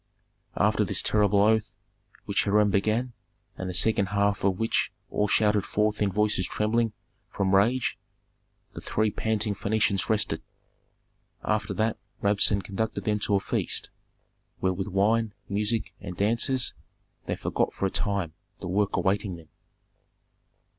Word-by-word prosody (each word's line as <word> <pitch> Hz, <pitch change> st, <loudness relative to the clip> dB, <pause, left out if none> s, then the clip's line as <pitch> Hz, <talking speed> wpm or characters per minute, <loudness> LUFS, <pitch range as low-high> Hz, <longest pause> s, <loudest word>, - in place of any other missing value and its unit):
After -, -, +3 dB
this -, -, +1 dB
terrible 105 Hz, -1 st, +3 dB
oath, 110 Hz, 0 st, +2 dB, 0.5 s
which -, -, 0 dB
Hiram 105 Hz, 0 st, +3 dB
began, 110 Hz, +5 st, +1 dB, 0.4 s
and 95 Hz, -, -5 dB
the -, -, -4 dB
second 100 Hz, +1 st, +2 dB
half 100 Hz, +1 st, +1 dB
of 95 Hz, -2 st, +2 dB
which 115 Hz, +1 st, 0 dB, 0.2 s
all 105 Hz, -, +1 dB
shouted 105 Hz, -1 st, +3 dB
forth 105 Hz, +1 st, 0 dB
in 100 Hz, -2 st, +2 dB
voices 105 Hz, -2 st, +1 dB
trembling 110 Hz, +2 st, 0 dB, 0.4 s
from 95 Hz, -1 st, 0 dB
rage, 115 Hz, +6 st, +2 dB, 0.7 s
the -, -, -8 dB
three 110 Hz, 0 st, 0 dB
panting 110 Hz, -1 st, -1 dB
Phœnicians 100 Hz, -1 st, 0 dB
rested. 105 Hz, -7 st, +1 dB, 1.0 s
After 105 Hz, 0 st, -1 dB
that 110 Hz, +1 st, 0 dB, 0.2 s
Rabsun 100 Hz, 0 st, +2 dB
conducted 100 Hz, +5 st, -3 dB
them 105 Hz, -1 st, 0 dB
to 105 Hz, 0 st, +1 dB
a -, -, +4 dB
feast -, -, -2 dB, 0.7 s
where 95 Hz, 0 st, 0 dB
with 95 Hz, +1 st, -4 dB
wine, 105 Hz, +2 st, +1 dB
music, 105 Hz, +3 st, -1 dB
and 90 Hz, -1 st, -7 dB
dancers 115 Hz, +5 st, +1 dB, 0.5 s
they -, -, -1 dB
forgot -, -, -1 dB
for -, -, -3 dB
a 95 Hz, -, 0 dB
time 100 Hz, -6 st, -1 dB, 0.3 s
the -, -, -6 dB
work 100 Hz, +2 st, +1 dB
awaiting 95 Hz, -1 st, 0 dB
them. 80 Hz, -2 st, -14 dB
105 Hz, 140 wpm, -27 LUFS, 100-110 Hz, 1.0 s, a